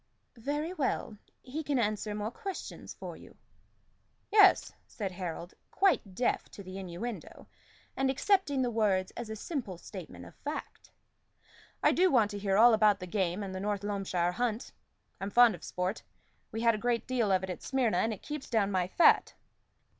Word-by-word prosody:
"Very 295 +8 -3
well. 260 - -2 0.2
He 275 +5 -4
can 285 -2 0
answer 215 -2 -1
more 210 +1 -3
questions 395 - -7
for - - -7
you." - - -15 0.9
"Yes," 410 -2 +6
said 200 -4 -4
Harold, 175 -1 -6 0.2
quite 270 - +1
deaf 245 - 0
to 200 - -9
the 185 +1 -7
innuendo, 190 +5 -6 0.5
and 270 0 +1
accepting 285 -2 +2
the 245 - 0
words 200 -4 +1
as 235 -2 -6
a 220 - -4
simple 220 - -4
statement - - -9
of - - -13
the - - -35
fact. - - -6 0.9
"I - - +6 0.2
want 230 - +3
to 205 - -5
hear 195 -1 +1
all 235 +2 +8
about 215 -2 +4
the 180 - -6
game 185 +1 -1
and 190 -1 -5
the 185 - -4
North 205 0 -2
Loamshire 195 -4 0
hunt. 235 +1 -2 0.5
I'm 195 - -3
fond 240 +1 +6
of 175 - -10
sport; 180 +3 -3 0.5
we 225 - -3
had 230 0 +4
a 215 - -3
great 235 0 0
deal 240 -5 +1
of 190 -1 +2
it 190 - -3
at 180 - -7
Smyrna, 245 -8 +1
and 225 - +1
it 215 - -7
keeps 300 -2 -6
down 210 -4 +2
my 185 -2 +1
fat." 335 - +4
215 Hz, 180 wpm, -31 LUFS, 195-250 Hz, 0.9 s, all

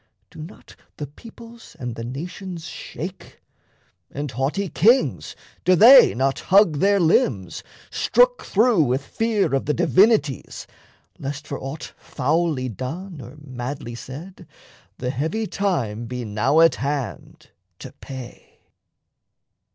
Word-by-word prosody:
Do - - -10
not 160 +5 -12 0.2
the 150 - -4
peoples 230 - -14
and 125 -5 -5
the 115 - -7
nations 170 +7 -7
shake, 180 +2 -8 0.7
And 145 -1 -5
haughty 140 - -1
kings 235 +9 +2 0.3
do 185 - +4
they 245 +7 +8
not 135 +2 0
hug 190 -6 +4
their 200 +2 +3
limbs, 125 - +1 0.3
Strook - - +3
through 220 -2 +3
with 135 0 0
fear 220 -5 0
of 135 - 0
the 150 - +1
divinities, 185 - +2 0.5
Lest 145 +2 -5
for 140 - -5
aught 135 +4 -7
foully 150 -1 -1
done 145 - -6
or 125 +4 -11
madly 130 -2 -6
said 135 +10 -10 0.5
The 125 0 -3
heavy 160 - -2
time 125 - -2
be 125 0 -5
now 120 +9 +2
at 165 -4 +6
hand 135 -5 -5 0.3
to - - -10
pay? 130 -3 -11
150 Hz, 125 wpm, -22 LUFS, 130-190 Hz, 0.7 s, they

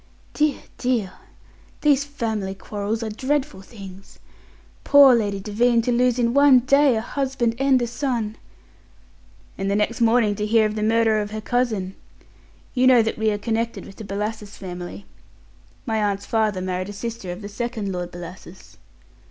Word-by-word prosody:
"Dear, 300 -2 0 0.2
dear! 235 -7 0 0.7
These 285 -2 +3
family 220 -9 -3
quarrels 210 +3 -4
are 220 - -3
dreadful 265 -2 -2
things. 195 -2 -12 0.7
Poor 280 -2 +7
Lady 205 -4 0
Devine, 230 +4 +2
to 245 - 0
lose 245 0 +2
in 235 -1 +1
one 280 -2 +6
day 275 0 +4
a 220 - -1
husband 260 -2 -1
and 270 -1 +4
a 240 - 0
son!" 235 -3 -2 1.2
"And 195 0 -1
the 200 - +1
next 215 +3 0
morning 230 -2 +3
to 210 - -1
hear 220 0 +4
of 210 - -1
the 215 - -3
murder 220 0 +2
of 205 - -4
her 215 +1 -5
cousin! 215 -5 -1 0.8
You 255 0 +3
know 250 -3 +6
that 220 0 -3
we 220 0 +2
are 205 - 0
connected 230 +2 -2
with 195 - -13
the 220 - -8
Bellasis 210 +1 -5
family. 180 +1 -8 0.8
My 225 -3 -1
aunt's 200 -1 -1
father 215 -4 0
married 185 +1 -3
a - - -6
sister 220 -3 -5
of 180 +4 -8
the - - -5
second 215 -1 -4
Lord 180 -1 -4
Bellasis." 175 +1 -11
220 Hz, 170 wpm, -23 LUFS, 200-245 Hz, 1.2 s, Poor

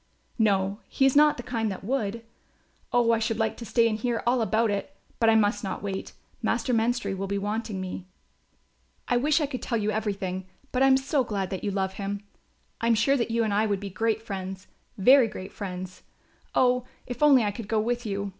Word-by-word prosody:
"No, 200 -2 +2
he 270 - +1
is 270 - +3
not 300 0 +6
the 245 - -6
kind 225 -3 -1
that 190 - -7
would. 230 -1 -2 0.7
Oh, 240 -1 +3
I 230 - +3
should 225 0 -1
like 220 -1 0
to 235 - -8
stay 230 +3 +3
and 215 -1 -1
hear 235 0 -1
all 245 +1 +2
about 220 +1 +2
it! 205 +8 -4 0.2
But 225 - +4
I 225 - +5
must 205 -1 +2
not 190 0 -4
wait, 195 -1 -4 0.3
Master 235 +2 0
Menstrie 230 -3 +1
will 195 +1 -3
be 200 +1 -1
wanting 210 0 -3
me." 185 0 -6 1.0
"I 245 - +2
wish 295 +5 +3
I 300 - +1
could 270 -3 -5
tell 235 - -1
you 215 -1 0
everything; 195 -3 -3 0.2
but 255 - 0
I 270 - +6
am 265 0 +6
so 270 +1 +1
glad 200 -5 -3
that 190 - -4
you 205 - 0
love 190 -1 -1
him. 200 +1 -3 0.6
I 230 - +1
am 230 - +4
sure 275 +5 +3
that 240 -3 0
you 230 0 +1
and 215 -2 0
I 215 +2 +2
would 200 -2 0
be 200 -1 -6
great 220 +3 0
friends, 190 -2 -6 0.3
very 255 +5 +6
great 190 -3 -8
friends; 185 -2 -6 0.5
oh, 250 0 +3 0.2
if 245 +3 -7
only 280 -5 +6
I 205 - 0
could 210 0 -8
go 220 0 +1
with 240 +2 -1
you! 200 -2 -3
220 Hz, 220 wpm, -27 LUFS, 200-245 Hz, 1.0 s, not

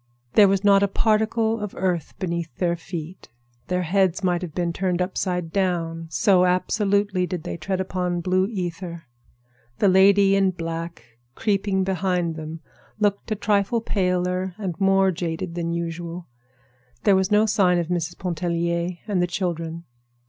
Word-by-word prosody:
There 205 -2 +7
was 195 0 +1
not 200 -1 +5
a 200 - +3
particle 220 +2 +1
of 210 -2 -5
earth 180 -4 -1
beneath 170 -2 -3
their 175 -2 +1
feet. 170 +1 -8 0.4
Their 180 0 0
heads 190 +2 +1
might 175 -1 +1
have 170 -4 -7
been 175 -2 -1
turned 180 0 -1
upside 180 -2 -2
down, 165 -4 -1
so 180 +5 +3
absolutely 195 +1 +1
did 175 -4 -4
they - - -4
tread 185 +3 -3
upon 180 -2 -2
blue 185 +2 +1
ether. 175 -4 -5 0.7
The 205 - +3
lady 195 +1 +5
in 195 -1 +3
black, 165 -3 -5 0.3
creeping 195 -2 0
behind 180 -3 0
them, 155 +1 -7 0.4
looked 205 0 0
a - - +2
trifle 205 +2 +1
paler 180 -3 -1
and 195 -5 -3
more 195 0 +4
jaded 170 0 -4
than 170 -1 -2
usual. 170 +1 -4 0.8
There 200 -2 +5
was 190 0 +2
no 210 +1 +4
sign 190 -4 +3
of 170 -1 -1
Mrs. 175 -1 -2
Pontellier 170 0 -2
and 195 -4 +1
the 175 - +2
children. 170 -3 -3
180 Hz, 155 wpm, -23 LUFS, 170-195 Hz, 0.8 s, There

